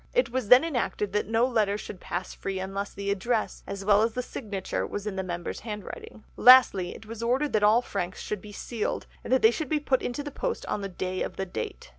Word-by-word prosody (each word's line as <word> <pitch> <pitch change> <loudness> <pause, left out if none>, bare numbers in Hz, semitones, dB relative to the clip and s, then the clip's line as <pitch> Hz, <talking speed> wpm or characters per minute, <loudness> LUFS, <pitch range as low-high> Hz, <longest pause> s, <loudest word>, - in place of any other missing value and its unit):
It - - +2
was 255 -3 -2
then 250 +5 +8
enacted 240 -9 -2
that 210 - 0
no 225 +2 +3
letter 215 -5 +1
should 205 -2 -8
pass 180 +1 -4
free 195 -1 -4
unless 195 +2 -4
the 200 0 -3
address, 220 +3 -1
as 200 0 -5
well 205 0 +5
as 225 0 +1
the 250 - -2
signature, 205 -7 -4
was 205 - -5
in 210 -2 -3
the 190 - -1
member's 175 -2 -4
handwriting. 210 0 -8
Lastly, 245 -8 +7
it 220 - -12
was 230 +1 -8
ordered 260 +5 +1
that 215 - +3
all 215 +4 +5
franks 185 -5 -4
should 210 -3 -4
be 210 - -11
sealed 220 +1 -3 0.2
and - - -7
that 260 - +3
they 220 - +8
should 300 +3 -4
be 310 - +1
put 270 -3 +1
into 245 +4 -3
the 290 - -6
post 470 - -3
on 210 - -2
the 195 - -4
day 185 0 -3
of - - -3
the 195 - -3
date. 110 - -6
210 Hz, 240 wpm, -27 LUFS, 195-245 Hz, 0.2 s, then